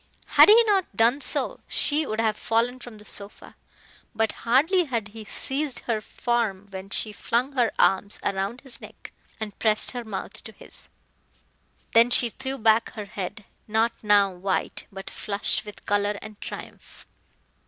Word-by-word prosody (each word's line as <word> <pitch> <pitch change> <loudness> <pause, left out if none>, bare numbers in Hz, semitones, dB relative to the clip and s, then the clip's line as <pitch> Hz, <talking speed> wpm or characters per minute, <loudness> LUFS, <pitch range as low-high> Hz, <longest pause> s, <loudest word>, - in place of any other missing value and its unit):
Had - - +7
he 455 +2 +8
not 390 - 0
done 235 +5 +3
so - - +4
she 300 0 +2
would 215 - -3
have 220 -2 +1
fallen 235 +4 0
from 240 -3 -10
the 210 - -15
sofa. 200 -1 -7 0.6
But 220 0 +1
hardly 320 +10 +2
had 230 -7 -3
he 220 +1 -10
seized 275 +5 -1
her 225 -3 -2
form 220 -4 -2
when 190 0 -8
she 215 +1 +3
flung 235 +7 -1
her 245 -4 +1
arms 200 +2 +2
round 200 +5 -2
his 265 -2 -10
neck - - -12 0.3
and 215 -2 -7
pressed 215 -1 +2
her 245 -1 -5
mouth 210 -4 -7
to - - -8
his. - - -5 1.0
Then 230 +1 +6
she 240 -1 +3
threw 265 +2 -5
back 220 -1 +2
her 215 -3 -6
head, 200 +1 -6 0.2
not 220 +2 +2
now 205 -2 +4
white, 185 +2 -3
but 195 0 -9
flushed 205 0 -2
with 210 - -11
color 205 0 0
and 215 -1 -12
triumph. - - -10
220 Hz, 165 wpm, -25 LUFS, 205-245 Hz, 1.0 s, he